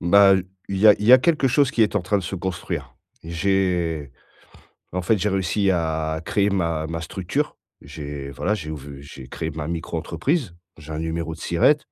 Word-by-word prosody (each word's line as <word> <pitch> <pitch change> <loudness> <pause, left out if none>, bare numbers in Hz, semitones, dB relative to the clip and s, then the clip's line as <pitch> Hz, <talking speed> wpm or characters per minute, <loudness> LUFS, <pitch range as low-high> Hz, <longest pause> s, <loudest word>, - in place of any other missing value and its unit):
Bah, 100 +2 +6 0.3
il 100 - -2
y 110 - +5
a 105 - +9
il 105 - -3
y 125 - +8
a 130 - +10
quelque 150 -2 +2
chose 140 +1 +3
qui 120 - +2
est 105 -1 +1
en 100 - +1
train 100 +3 +1
de - - -4
se 95 - -4
construire. 90 -2 -4 0.3
J'ai, 85 -4 0 0.8
en 90 - -2
fait, 105 +4 +2
j'ai 105 +3 0
réussi 95 +1 +1
à 80 -2 -1
créer 100 0 +2
ma 85 -5 0
ma 85 0 -4
structure. 95 - -3 0.2
J'ai, 70 -1 -7
voilà, 90 +9 -1
j'ai 80 -7 -4
ouv 70 -2 -8
j'ai 70 -2 -11
créé 80 +4 -4
ma 75 0 -5
micro-entreprise, 85 - -2 0.2
j'ai 75 0 -11
un 75 - -3
numéro 80 0 -3
de 80 - -12
SIRET. 85 - +3
85 Hz, 195 wpm, -23 LUFS, 80-100 Hz, 0.8 s, a